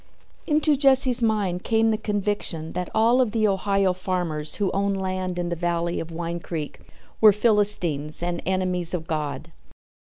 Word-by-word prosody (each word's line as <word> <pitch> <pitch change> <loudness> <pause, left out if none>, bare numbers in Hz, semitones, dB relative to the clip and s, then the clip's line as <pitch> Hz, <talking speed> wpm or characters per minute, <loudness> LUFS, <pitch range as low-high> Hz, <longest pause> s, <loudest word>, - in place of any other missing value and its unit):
Into 305 -1 +3
Jesse's 265 -3 +5
mind 205 -5 0
came 225 0 +2
the - - +1
conviction 205 -6 -2
that 180 0 -4
all 235 +4 +4
of 235 -4 -1
the 220 -2 +2
Ohio 195 -1 +1
farmers 175 -5 -2
who 200 -3 -1
owned 195 0 -1
land 185 -1 -3
in 175 -1 -2
the 170 - -2
valley 170 0 -2
of 165 - -6
Wine 170 +1 -4
Creek 160 -3 -6 0.4
were 215 -1 +8
Philistines 200 -9 +1
and 175 0 -3
enemies 180 -2 0
of 165 -2 -5
God. 155 0 -4
185 Hz, 160 wpm, -24 LUFS, 170-215 Hz, 0.4 s, were